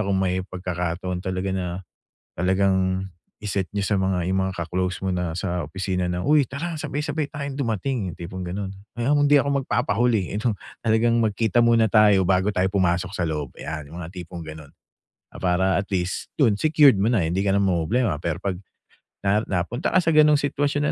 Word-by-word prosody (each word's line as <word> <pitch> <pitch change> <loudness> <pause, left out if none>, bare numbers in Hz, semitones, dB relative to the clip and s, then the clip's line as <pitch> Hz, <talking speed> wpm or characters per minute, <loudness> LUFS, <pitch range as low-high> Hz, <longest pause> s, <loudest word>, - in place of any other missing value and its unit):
kung 100 -2 0
may 95 -1 +1
pagkakataon 90 -1 -4
talaga 95 0 -3
na, 95 -1 -2 0.7
talagang 95 +1 +1 0.4
i-set 95 -2 -1
niyo 100 - 0
sa 100 0 +1
mga 95 -2 0
yung 95 0 +1
mga - - -4
ka-close 90 +2 -2
mo 95 - 0
na 90 -2 -2
sa 90 -1 -2
opisina 90 0 -2
na, 90 0 -2
“Uy 145 -2 +4
tara, 155 +4 -4
sabay-sabay 150 0 -2
tayong 140 -1 -5
dumating.” 115 -2 -1
Yung 85 - -7
tipong 90 +2 -7
ganun. 95 +2 -4 0.2
“Ay 120 - -2
ako 145 +3 +3
hindi 145 - +6
ako 140 - +3
magpapahuli 120 -6 0
eh 100 - -2
ano, 115 -2 0 0.2
talagang 115 +1 +2
magkita 110 +1 +1
muna 115 -1 +4
tayo 105 -3 +5
bago 95 +2 +2
tayo 95 -3 +1
pumasok 90 -1 +1
sa 90 -5 -1
loob.” 75 -4 -3
Ayan, 75 -2 -6
yung 85 - -7
mga 80 - -6
tipong 85 -1 -7
gano'n. 80 -2 -10 0.6
Ah, - - -10
para 95 +1 +2
at 100 - -7
least 90 -2 -2
dun 120 -8 +4
secured 150 -3 +6
mo 105 - +2
na, 110 -8 +2
hindi 85 +4 0
ka 100 0 +2
na - - +3
mamomroblema. 95 0 +1
Pero 85 -1 -2
'pag 95 -2 -2 0.6
na 105 +2 +3
napunta 95 - -1
ka - - +4
sa 165 - +2
ganung 150 -1 +6
sitwasyon 145 0 0
95 Hz, 190 wpm, -23 LUFS, 90-115 Hz, 0.7 s, hindi